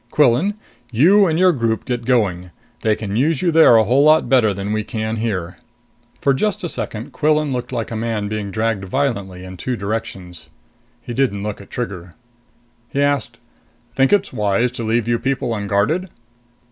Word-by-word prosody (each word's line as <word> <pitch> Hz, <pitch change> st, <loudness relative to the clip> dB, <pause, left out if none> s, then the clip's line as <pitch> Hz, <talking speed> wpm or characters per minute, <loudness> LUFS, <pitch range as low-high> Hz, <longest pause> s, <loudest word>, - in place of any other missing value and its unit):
"Quillan, 150 Hz, -, +3 dB, 0.4 s
you 185 Hz, -, +5 dB
and 160 Hz, -1 st, 0 dB
your 185 Hz, +1 st, +5 dB
group 115 Hz, -7 st, -1 dB
get 120 Hz, -2 st, -3 dB
going! 100 Hz, -8 st, +1 dB, 0.3 s
They 110 Hz, -1 st, +2 dB
can 105 Hz, -2 st, -5 dB
use 145 Hz, +6 st, +1 dB
you 175 Hz, -, +2 dB
there 160 Hz, -7 st, +7 dB
a 110 Hz, -, +6 dB
whole 125 Hz, +6 st, +3 dB
lot 155 Hz, +1 st, +5 dB
better 125 Hz, -6 st, +4 dB
than 100 Hz, +2 st, -3 dB
we 110 Hz, 0 st, -1 dB
can 110 Hz, +1 st, -3 dB
here." 95 Hz, -6 st, -3 dB, 0.6 s
For 140 Hz, -, +3 dB
just 210 Hz, +7 st, -1 dB
a 175 Hz, -, -2 dB
second, 110 Hz, -3 st, -5 dB
Quillan 150 Hz, -2 st, +1 dB
looked 125 Hz, 0 st, -4 dB
like 120 Hz, -3 st, -3 dB
a -, -, -3 dB
man 110 Hz, -2 st, -2 dB
being 105 Hz, -1 st, -4 dB
dragged 110 Hz, -1 st, -1 dB
violently 100 Hz, -6 st, -2 dB
in 95 Hz, 0 st, -9 dB
two 125 Hz, +7 st, -3 dB
directions. 100 Hz, -5 st, -5 dB, 0.5 s
He 120 Hz, -, -6 dB
didn't 115 Hz, -7 st, 0 dB
look 105 Hz, -1 st, -5 dB
at 100 Hz, -, -15 dB
Trigger. 95 Hz, -8 st, -6 dB, 0.7 s
He 140 Hz, -, -3 dB
asked, 145 Hz, -1 st, 0 dB, 0.6 s
"Think 135 Hz, 0 st, +3 dB
it's 205 Hz, -8 st, +2 dB
wise 110 Hz, +2 st, +1 dB
to 120 Hz, -2 st, -5 dB
leave 115 Hz, +1 st, 0 dB
you 120 Hz, -1 st, +1 dB
people 135 Hz, -3 st, -1 dB
unguarded?" 105 Hz, -, 0 dB
115 Hz, 180 wpm, -19 LUFS, 105-135 Hz, 0.7 s, there